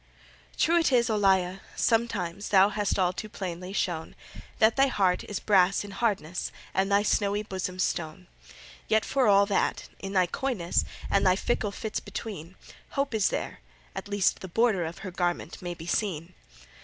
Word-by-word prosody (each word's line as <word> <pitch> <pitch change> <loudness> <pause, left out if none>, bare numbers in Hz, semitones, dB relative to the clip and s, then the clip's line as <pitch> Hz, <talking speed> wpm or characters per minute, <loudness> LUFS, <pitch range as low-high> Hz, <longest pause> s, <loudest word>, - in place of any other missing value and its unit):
True 340 +2 +4
it 325 - +2
is, 235 -2 +3
Olalla, 190 -3 +2 0.2
sometimes 205 -5 0
Thou 195 0 +6
hast 210 -1 -1
all 180 -2 +2
too 215 +3 -6
plainly 180 -3 -6
shown 170 -5 -2 0.4
That 220 +1 +4
thy 275 0 +4
heart 190 -8 +1
is 205 - -4
brass 195 -2 +3
in 205 - -9
hardness, 195 -5 -1 0.2
And 195 +1 +1
thy 200 +1 +4
snowy 205 0 +1
bosom 185 -3 -4
stone. 170 -1 -2 0.6
Yet 220 0 +2
for 265 -4 +2
all 200 0 +6
that, 200 - -1
in 195 0 -6
thy 185 -2 +4
coyness, 190 -3 -1 0.3
And 200 - +3
thy 185 -1 +5
fickle 215 +1 -1
fits 220 +1 -4
between, 190 -4 -7 0.4
Hope 275 -2 0
is 215 -3 +2
there - - -4 0.4
at - - -5
least 205 -2 +1
the 190 - -7
border 200 -2 +2
Of 165 +1 -6
her 185 - -5
garment 175 -1 -2
may 175 -1 -4
be 165 - -10
seen. 175 -2 -2
195 Hz, 170 wpm, -27 LUFS, 180-215 Hz, 0.6 s, Thou